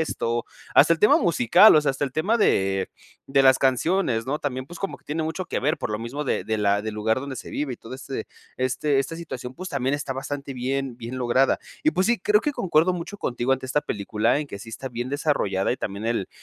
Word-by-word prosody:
esto, 120 -7 -1 0.3
hasta 170 - +7
el 165 - -10
tema 210 - +6
musical, 175 - +6
o - - +6
sea, 145 - +2
hasta 135 +2 -2
el 135 - -5
tema 200 +11 +1
de 95 - +2 0.4
de 135 0 +3
las 130 -1 +6
canciones, 130 -2 +1
¿no?, 145 +3 -2
también, 130 -3 -3
pues 175 +4 -10
como 195 - -4
que - - -31
tiene 155 +2 -2
mucho 160 +4 -3
que - - -3
ver, 150 +5 +1
por - - -4
lo 105 - -2
mismo 130 +6 -4
de - - 0
de 110 - -1
la 100 -1 +2
del 110 0 -5
lugar 110 +3 0
donde 135 -1 -6
se - - -8
vive 140 -4 -3
y - - -17
todo 115 - -12
este 135 0 -6 0.3
este 135 +2 0
esta 135 +4 -1
situación, 130 -7 -7
pues 185 +6 -7
también 135 -4 -1
está 145 - -4
bastante 135 +1 -5
bien, 130 0 -2
bien 120 +2 -6
lograda. 125 +2 +2 0.2
Y 310 - +4
pues 185 -9 +1
sí, 235 -1 +2
creo 210 +2 +3
que 295 - -1
concuerdo 175 - +2
mucho 180 +3 -6
contigo 120 -4 -2
ante 130 0 -2
esta 135 +3 +1
película, 110 -1 0
en 150 - -4
que 100 - -8
sí 115 - -10
está 125 +4 -6
bien 120 0 -4
desarrollada, 135 -9 0
y - - -3
también 100 0 -5
el 115 -5 -1
135 Hz, 245 wpm, -24 LUFS, 120-155 Hz, 0.4 s, hasta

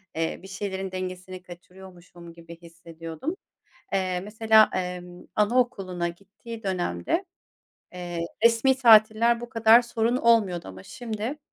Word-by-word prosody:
eee, 165 0 -2
bir - - -10
şeylerin 190 -1 -5
dengesini 185 0 -6
kaçırıyormuşum 175 -1 -14
gibi 170 0 -13
hissediyordum. 165 - -8 0.6
Eee, 185 -2 -1
mesela, 220 +2 +4
emm, 180 -1 -5
anaokuluna 205 -6 0
gittiği 200 +6 -11
dönemde, 195 - -2 0.7
eee, 175 -1 -6 0.2
resmî 235 +3 +4
tatiller 230 -1 +5
bu 240 - -7
kadar 230 +1 +5
sorun 235 +1 -1
olmuyordu 210 - +2
ama 95 0 -11
şimdi, 235 - -6
190 Hz, 115 wpm, -25 LUFS, 175-230 Hz, 0.7 s, tatiller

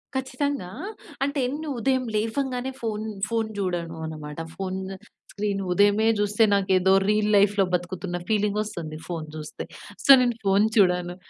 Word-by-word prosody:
ఖచ్చితంగా. 265 -5 -2 0.5
అంటేను 280 +2 -1
ఉదయం 260 +1 +1
లేవంగానే 250 +4 -1
ఫోన్ 215 -1 -2 0.2
ఫోన్ 225 -1 0
చూడను 175 -4 -2
అన్నమాట. 155 -1 -7 0.2
ఫోన్ 190 -1 -3 0.5
స్క్రీను 200 -1 -2
ఉదయమే 205 +3 +4
చూస్తే 205 +2 +2
నాకేదో 190 -1 +3 0.2
రీల్ 210 0 +2
లైఫ్‌లో 200 0 +4
బతుకుతున్న 175 0 -2
ఫీలింగ్ 210 -1 +1
వస్తుంది 165 -7 -6
ఫోన్ 165 -3 -4
చూస్తే. 155 0 -6 0.4
సో - - -5
నేను 240 -2 +1
ఫోన్ 195 +2 +4
చూడను. 180 -3 +3
205 Hz, 125 wpm, -25 LUFS, 180-230 Hz, 0.5 s, ఉదయమే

